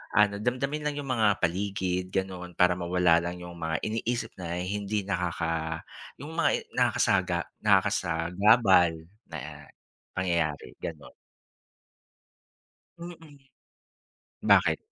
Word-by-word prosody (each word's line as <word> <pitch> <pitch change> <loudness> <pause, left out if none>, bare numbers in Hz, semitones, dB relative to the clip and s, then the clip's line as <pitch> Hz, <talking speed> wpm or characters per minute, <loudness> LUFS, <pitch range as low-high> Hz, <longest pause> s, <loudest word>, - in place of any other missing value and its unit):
Ano, 105 0 +5
damdamin 130 +6 -1
lang 150 -1 -2
yung 140 -3 -4
mga 110 -4 +3 0.2
paligid 90 0 -1
ganon 95 -2 -4
para 90 0 +4
mawala 90 -1 +3
lang 85 +1 -4
yung 85 -1 -10
mga 80 -1 -2
iniisip 115 +2 -2
na 85 -1 -4
hindi 100 +1 -2
nakaka 85 -3 -2 0.3
yung 145 +4 -9
mga - - +3 0.2
nakasaga - - +2 0.2
nakasagabal 95 -1 +3 0.3
na - - -8 0.5
pangyayari, 85 -5 -1
ganon. 75 -4 -7 1.9
Mm. 165 -4 -11 1.1
Bakit? - - +5
95 Hz, 100 wpm, -28 LUFS, 85-110 Hz, 1.9 s, Ano